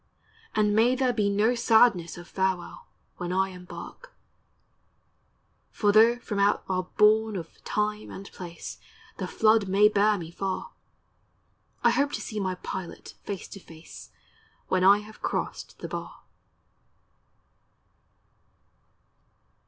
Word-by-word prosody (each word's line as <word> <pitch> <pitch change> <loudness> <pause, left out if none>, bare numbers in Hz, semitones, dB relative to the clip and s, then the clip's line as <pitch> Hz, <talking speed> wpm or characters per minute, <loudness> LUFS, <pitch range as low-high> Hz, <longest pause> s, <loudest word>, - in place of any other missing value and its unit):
And 210 -1 +2
may 235 +4 +4
there 255 -1 +1
be 210 -3 +1
no 210 +4 +2
sadness 220 -8 +3
of 175 0 -10
farewell, 190 -2 -2 0.3
When 175 0 -4
I 190 +1 +1
embark; 185 - -10 1.6
For 205 -1 +1
tho' 225 +3 +6
from 210 -4 -4
out 200 +1 +2
our 185 -1 -1
bourne 215 0 +4
of 165 -3 -8
Time 210 0 -2
and 195 - -9
Place 170 -2 -8 0.4
The - - -3
flood 215 -2 +3
may 200 +2 +5
bear 210 0 +3
me 165 -2 -7
far, 190 +2 -4 1.1
I - - +5
hope 285 +1 +1
to - - -3
see 215 - -5
my 185 -2 -1
Pilot 180 0 -7
face 200 -3 -6
to 195 - -9
face 165 -3 -13 0.6
When 185 -1 +2
I 200 +2 +7
have 215 +1 -14
crossed - - -4
the - - -6
bar. - - -7
205 Hz, 130 wpm, -27 LUFS, 185-220 Hz, 1.6 s, I